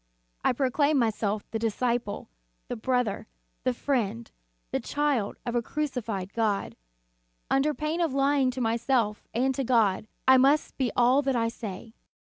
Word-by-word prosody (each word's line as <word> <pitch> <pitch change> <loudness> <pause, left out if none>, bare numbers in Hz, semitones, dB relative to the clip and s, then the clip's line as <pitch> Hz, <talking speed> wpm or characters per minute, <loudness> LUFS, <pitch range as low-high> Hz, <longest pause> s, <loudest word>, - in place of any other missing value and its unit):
I - - +4
proclaim 285 +3 +2
myself 215 -3 0
the 225 - -2
disciple, 230 -1 -1 0.4
the - - -2
brother, 245 -2 -1 0.4
the - - +2
friend, 200 - -2 0.4
the - - 0
child 290 -8 -1
of 240 - -2
a 240 - +2
crucified 230 -9 -3
God. 215 -3 0 0.8
Under 290 +2 +2
pain 310 +3 -2
of 330 -4 +1
lying 275 0 +2
to 250 - -5
to 260 - -3
myself 230 -1 0
and 260 +3 +1
to 270 - -2
God, 220 -5 +2 0.2
I 260 0 +8
must 275 +4 +3
be 255 -3 +1
all 250 +3 +5
that 270 -2 0
I 230 -1 +1
say. 220 -1 -8
245 Hz, 155 wpm, -27 LUFS, 220-270 Hz, 0.8 s, I